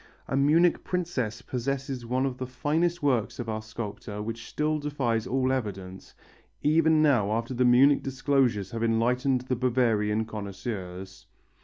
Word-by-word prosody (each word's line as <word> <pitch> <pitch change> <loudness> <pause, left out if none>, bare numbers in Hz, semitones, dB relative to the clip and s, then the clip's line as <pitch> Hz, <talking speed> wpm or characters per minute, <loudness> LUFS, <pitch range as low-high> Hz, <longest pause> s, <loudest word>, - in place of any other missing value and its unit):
A - - -2
Munich 155 +6 +3
princess 165 - -2
possesses 130 -1 -3
one 130 +2 +1
of 130 -2 -3
the 130 - -3
finest 155 +6 -1
works 120 -4 +1
of 120 - -5
our 110 -1 -3
sculptor 105 -1 -7
which 115 +2 -6
still 155 0 0
defies 130 -7 -1
all 130 0 +1
evidence 95 -7 -5 0.5
even 160 0 +4
now 120 -9 +3
after 115 +3 -2
the 125 0 +2
Munich 130 +4 +5
disclosures 130 -7 0
have 115 - -4
enlightened 125 +3 +1
the 130 0 -2
Bavarian 115 -4 +1
connoisseurs. 100 -3 -7
125 Hz, 145 wpm, -27 LUFS, 110-140 Hz, 0.5 s, Munich